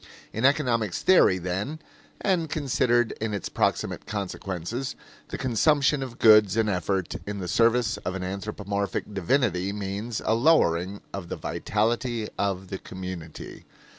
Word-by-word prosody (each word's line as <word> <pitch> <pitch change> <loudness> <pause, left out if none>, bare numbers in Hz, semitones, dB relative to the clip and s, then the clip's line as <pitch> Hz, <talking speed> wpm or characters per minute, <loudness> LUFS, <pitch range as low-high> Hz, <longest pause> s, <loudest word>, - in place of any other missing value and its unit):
In 110 +4 0
economic 120 - +2
theory, 180 - +5
then, 95 - -3 0.4
and 175 -5 +1
considered 120 -5 +1
in 110 -2 -1
its 100 - -4
proximate - - -1
consequences, 100 +3 -4 0.3
the - - -5
consumption 140 +3 +2
of 130 -3 -6
goods 105 -2 +6
and 110 -1 +3
effort 95 -1 -1
in 105 0 -3
the 95 -2 -4
service 115 +4 +2
of 90 +1 -4
an 95 - -4
anthropomorphic 100 +1 -3
divinity 100 -1 +1
means 105 +3 -4
a 110 - +3
lowering 100 - +3
of 95 -3 -6
the - - -3
vitality 115 +1 -1
of 95 -2 -1
the 95 - -5
community. 90 -4 -8
105 Hz, 135 wpm, -26 LUFS, 95-120 Hz, 0.4 s, goods